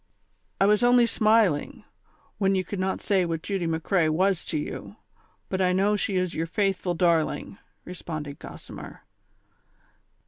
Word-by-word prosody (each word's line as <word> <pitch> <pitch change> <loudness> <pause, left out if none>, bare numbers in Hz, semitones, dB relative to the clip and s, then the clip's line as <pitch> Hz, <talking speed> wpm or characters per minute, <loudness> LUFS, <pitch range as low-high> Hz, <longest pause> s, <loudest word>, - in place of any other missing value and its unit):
''I 195 - +5
was 210 +1 +4
only 245 0 +5
smiling, 215 -8 +2 0.6
when 195 -1 +2
you 185 - +1
could 200 - -5
not 190 +1 -1
say 195 -3 +2
what 165 -2 -3
Judy 195 -4 -2
McCrea 165 +1 +1
was 185 +3 +1
to - - -2
you; 150 - -6 0.5
but 190 0 -2
I 180 -1 +3
know 200 +3 +2
she 200 -1 -1
is 185 -1 0
your 165 +1 -2
faithful 190 -1 0
dar 170 -2 +4
ling," 195 - -6 0.3
responded 155 -5 -6
Gossimer. - - -10
185 Hz, 150 wpm, -26 LUFS, 165-200 Hz, 0.6 s, I